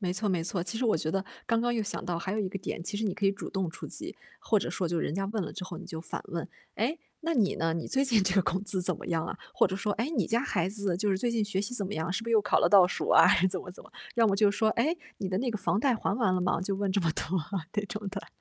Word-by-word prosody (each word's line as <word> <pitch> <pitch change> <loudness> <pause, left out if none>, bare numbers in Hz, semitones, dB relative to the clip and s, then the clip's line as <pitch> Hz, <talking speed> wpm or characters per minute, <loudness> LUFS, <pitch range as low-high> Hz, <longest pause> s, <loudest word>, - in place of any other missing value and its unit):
没 180 -3 -1
错 205 +3 -1
没 180 -4 +1
错， 175 +1 -2
其 210 +6 -3
实 250 - -1
我 220 - +3
觉 155 0 -2
得 195 +2 -1 0.2
刚 230 -1 +2
刚 240 +1 +1
又 225 - +1
想 205 - -4
到， 175 -1 -1
还 190 +3 -3
有 215 - -1
一 200 - 0
个 195 - -5
点， 175 -2 -4
其 205 +3 -3
实 220 - -1
你 195 -4 0
可 205 - -3
以 195 - +5
主 200 - -7
动 190 -4 -2
出 - - -8
击， - - -6 0.3
或 215 - +3
者 - - -3
说 180 - -1
就 170 0 0
人 155 - -1
家 195 +2 -1
问 210 0 -2
了 - - -5
之 190 - -6
后 180 -1 -7
你 - - -9
就 160 - -6
反 165 - -5
问： 170 0 -3 0.3
“哎， 245 +10 0 0.2
那 330 +1 -1
你 215 -8 +3
呢？ 165 0 +1
你 165 0 -3
最 270 +1 +1
近 230 -6 +3
这 190 -1 +1
个 195 - +5
工 185 +2 -1
资 190 -2 -1
怎 - - 0
么 - - -10
样 165 -2 0
啊？” - - -5 0.2
或 - - +5
者 190 0 -3
说： 205 +1 -1
“哎， 235 +6 -1
你 210 -8 +2
家 230 +1 +2
孩 180 -8 0
子， 200 -3 -1
就 205 +3 +1
是 190 - +2
最 240 +5 0
近 230 -2 +1
学 200 -2 -1
习 210 +5 -3
怎 205 -5 -2
么 205 - -4
样？ 160 +3 -2
是 225 - -1
不 230 - -5
是 - - 0
又 220 -2 +5
考 210 - +3
了 - - +4
倒 195 -3 +8
数 180 - -3
啊？” - - +8 0.2
怎 185 0 -2
么 - - -9
怎 180 - -12
么， - - -17 0.2
要 230 -1 +4
么 200 - +3
就 205 0 +5
说： 215 +2 +2
“哎， 310 +9 +2 0.2
你 190 - -2
的 185 0 0
那 250 +2 0
个 220 - -2
房 200 - 0
贷 260 -1 +3
还 200 - -1
完 230 -7 +2
了 180 - +1
吗？” 180 -1 +1
就 195 +1 -1
问 200 0 -1
这 200 - +2
么 165 -3 +1
多， - - -2 0.5
这 210 - 0
种 210 +1 -5
的。 195 0 -6
195 Hz, 360 characters per minute, -29 LUFS, 185-220 Hz, 0.5 s, 倒